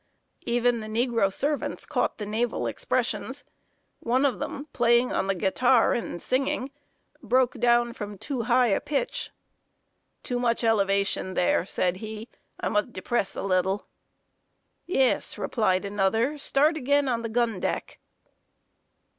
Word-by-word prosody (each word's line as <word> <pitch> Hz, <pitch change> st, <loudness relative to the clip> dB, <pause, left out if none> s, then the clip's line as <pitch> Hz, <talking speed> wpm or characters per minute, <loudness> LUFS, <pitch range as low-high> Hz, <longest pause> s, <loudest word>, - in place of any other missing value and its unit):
Even 240 Hz, 0 st, +2 dB
the 215 Hz, -, -7 dB
negro 230 Hz, -2 st, +1 dB
servants 290 Hz, +8 st, -1 dB
caught -, -, -1 dB
the 210 Hz, -, -5 dB
naval 225 Hz, +3 st, -1 dB
expressions. -, -, -2 dB, 0.6 s
One 255 Hz, +4 st, +1 dB
of 250 Hz, -9 st, 0 dB
them, 280 Hz, +10 st, -5 dB
playing 240 Hz, +1 st, +3 dB
on -, -, 0 dB
the 195 Hz, -, +1 dB
guitar 230 Hz, +6 st, +3 dB
and 230 Hz, -7 st, -3 dB
singing, 265 Hz, +3 st, -1 dB, 0.5 s
broke 250 Hz, +1 st, +1 dB
down 240 Hz, 0 st, +3 dB
from 205 Hz, -4 st, -7 dB
too 260 Hz, +4 st, -3 dB
high 245 Hz, 0 st, +4 dB
a 195 Hz, -, +1 dB
pitch. 300 Hz, -, -2 dB, 0.9 s
"Too 245 Hz, -1 st, -2 dB
much 235 Hz, -1 st, +1 dB
elevation 200 Hz, -3 st, +1 dB
there," 180 Hz, 0 st, +2 dB
said 180 Hz, -2 st, 0 dB
he. 220 Hz, +2 st, -7 dB, 0.3 s
"I -, -, -2 dB
must 210 Hz, +3 st, 0 dB
depress 195 Hz, +1 st, -2 dB
a -, -, -4 dB
little." 190 Hz, +1 st, 0 dB, 1.0 s
"Yes," 270 Hz, -8 st, +2 dB
replied 195 Hz, -4 st, 0 dB
another. 220 Hz, +8 st, 0 dB
"Start 300 Hz, +3 st, +2 dB
again 285 Hz, 0 st, +2 dB
on 235 Hz, -2 st, 0 dB
the 230 Hz, -, -4 dB
gun 230 Hz, -3 st, 0 dB
deck." -, -, -3 dB
235 Hz, 140 wpm, -26 LUFS, 200-250 Hz, 1.0 s, high